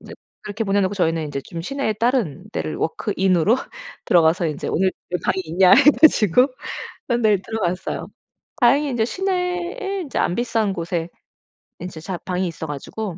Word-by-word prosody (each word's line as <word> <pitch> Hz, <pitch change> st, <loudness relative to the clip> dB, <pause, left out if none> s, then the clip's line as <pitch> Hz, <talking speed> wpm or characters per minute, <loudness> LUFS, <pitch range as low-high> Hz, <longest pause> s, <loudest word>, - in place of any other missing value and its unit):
이제 -, -, -12 dB, 0.3 s
그렇게 215 Hz, +2 st, -4 dB
보내 200 Hz, 0 st, +2 dB
놓고 190 Hz, +1 st, 0 dB
저희는 165 Hz, -5 st, 0 dB
이제 140 Hz, -1 st, -4 dB
좀 165 Hz, +4 st, -7 dB
시내에 275 Hz, 0 st, -2 dB
다른 215 Hz, -, 0 dB
데를 155 Hz, -, -3 dB
워크인으로 190 Hz, +3 st, +1 dB, 0.5 s
들어가서 170 Hz, 0 st, +3 dB
이제 150 Hz, -2 st, -4 dB
"오늘 190 Hz, +1 st, +1 dB, 0.2 s
여기 180 Hz, -2 st, -2 dB
방이 190 Hz, -, +1 dB
있냐?" 180 Hz, +3 st, +4 dB
해 275 Hz, -, +8 dB, 0.2 s
가지고 250 Hz, -, +5 dB, 0.6 s
그런 240 Hz, -1 st, 0 dB
데를 210 Hz, -3 st, +3 dB
들어갔어요. 190 Hz, -3 st, -3 dB, 0.5 s
다행히 275 Hz, +4 st, +4 dB
인제 235 Hz, -3 st, +1 dB
시내에 370 Hz, -, -2 dB
인제 280 Hz, -, -4 dB
안 175 Hz, -, +1 dB
비싼 225 Hz, -4 st, 0 dB
곳에 170 Hz, -1 st, -3 dB, 0.7 s
인제 175 Hz, -2 st, -7 dB
자 180 Hz, +2 st, -4 dB
방이 185 Hz, 0 st, -1 dB
있어 165 Hz, -1 st, -6 dB
가지고 170 Hz, +6 st, -5 dB
195 Hz, 360 characters per minute, -21 LUFS, 170-240 Hz, 0.7 s, 해